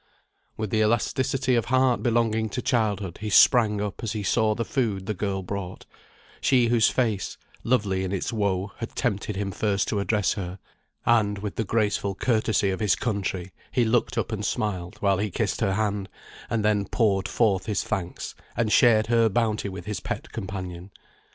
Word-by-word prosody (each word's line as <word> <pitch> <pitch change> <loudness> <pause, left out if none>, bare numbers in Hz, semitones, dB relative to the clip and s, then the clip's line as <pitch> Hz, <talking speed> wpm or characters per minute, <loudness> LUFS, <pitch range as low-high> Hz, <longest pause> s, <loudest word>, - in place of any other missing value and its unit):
With 110 -2 -3
the 110 - +2
elasticity 130 +4 +1
of 115 -3 +2
heart 130 -1 +2
belonging 115 -2 +1
to 125 +4 -3
childhood 105 -8 0
he 110 - -3
sprang 105 -1 +5
up 105 -1 -4
as 110 - -2
he 105 -2 -3
saw 110 +2 +2
the 115 - -2
food 105 -8 -1
the 110 - -1
girl 95 0 -2
brought; 95 -1 -6 0.6
she 125 -3 +3
whose 115 -2 +4
face, 110 -6 -1 0.3
lovely 105 -6 +1
in 95 - -3
its 100 +4 -2
woe, 100 -2 0
had 115 - -6
tempted 105 -4 -1
him 100 0 -2
first 100 0 0
to 105 - 0
address 105 0 +1
her; 95 -2 -5 0.5
and, 105 -3 +3
with 100 0 -5
the 115 - 0
graceful 105 -2 0
courtesy 110 -3 +1
of 95 - -3
his 105 -4 +3
country, 95 -4 -3 0.2
he 125 -2 +2
looked 115 +1 +1
up - - -1
and 105 -2 -3
smiled 95 -5 -2
while 100 -2 +2
he 105 +1 -1
kissed - - -2
her 95 - +1
hand, 105 -2 -1 0.4
and 110 -2 0
then 105 -2 +2
poured 100 -5 +1
forth 100 -5 +1
his 105 - 0
thanks, 90 -2 -4 0.2
and 115 -2 +1
shared 110 0 +5
her 115 0 +3
bounty 110 -1 0
with 95 - -8
his 105 0 -3
little - - -24
pet - - -15
companion. 95 -1 -6
105 Hz, 185 wpm, -25 LUFS, 100-115 Hz, 0.6 s, sprang